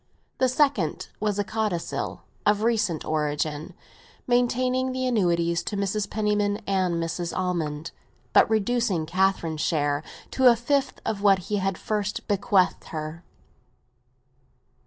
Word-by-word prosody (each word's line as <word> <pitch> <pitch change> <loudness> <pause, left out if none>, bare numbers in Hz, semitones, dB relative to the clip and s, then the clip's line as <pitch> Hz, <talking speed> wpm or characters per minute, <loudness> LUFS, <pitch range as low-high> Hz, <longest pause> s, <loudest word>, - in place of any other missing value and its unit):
The 260 - +3
second 255 - +1
was 210 -1 0
a 205 - +1
codicil, 210 -4 -3 0.2
of 210 +1 +2
recent 215 -8 +1
origin, 150 +2 -2 0.5
maintaining 255 +1 +1
the 255 0 -1
annuities 170 -7 +1
to 205 - -3
Mrs. 200 +1 -1
Penniman 210 -1 +1
and 185 -3 +1
Mrs. 170 +1 -3
Almond, 165 -4 -2 0.4
but - - +6
reducing 220 -5 +1
Catherine's 170 -2 0
share 145 -3 +1 0.3
to 260 -1 +6
a 235 - +5
fifth 270 +3 -1
of 210 -2 -2
what 200 -2 +5
he 195 +3 -3
had 195 -1 -1
first 210 -1 -3
bequeathed 200 -2 +2
her. 155 +2 -6
200 Hz, 125 wpm, -25 LUFS, 170-220 Hz, 0.5 s, but